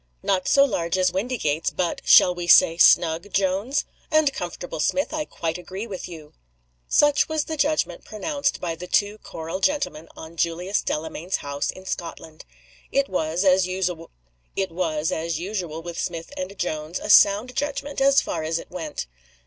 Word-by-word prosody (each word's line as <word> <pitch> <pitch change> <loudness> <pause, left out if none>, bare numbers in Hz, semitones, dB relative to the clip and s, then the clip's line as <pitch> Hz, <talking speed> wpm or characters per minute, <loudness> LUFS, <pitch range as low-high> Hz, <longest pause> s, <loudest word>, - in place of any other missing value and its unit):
"NOT 185 -2 0
SO 280 -1 +5
large 170 -8 -1
as 185 -1 +2
Windygates. 190 - -1
But 175 -2 -2
shall 180 - +7
we 175 -1 -5
say 165 -1 +6
snug, 170 +4 +4
Jones?" 200 +9 0 0.2
"And 310 -3 +3
comfortable, 175 -4 -6
Smith. 280 - 0
I 305 -1 -2
quite 165 - -4
agree 190 +4 -6
with 190 -5 -7
you." 155 -3 -11 0.5
Such 295 +1 +3
was 315 -1 0
the 320 - -4
judgment 290 - 0
pronounced 280 +7 -2
by 170 -2 -3
the 175 +2 -8
two 205 +3 +1
choral 165 +3 -6
gentlemen 195 - -1
on 160 +1 -10
Julius 175 +4 0
Delamayn's 160 +3 -3
house 140 0 -2
in 185 - -7
Scotland. 165 -3 -6 0.5
It 275 0 +1
was, 170 +1 -1
as 185 -1 +4
usual 180 -3 -3 0.5
with 170 0 -2
Smith 165 -2 -4
and 185 +2 -6
Jones, 155 -1 -3
a - - -6
sound 205 +6 +6
judgment 290 0 -3
as 275 0 +5
far - - -3
as 160 +1 -1
it - - -9
went. 160 - -5
180 Hz, 155 wpm, -24 LUFS, 165-215 Hz, 0.5 s, shall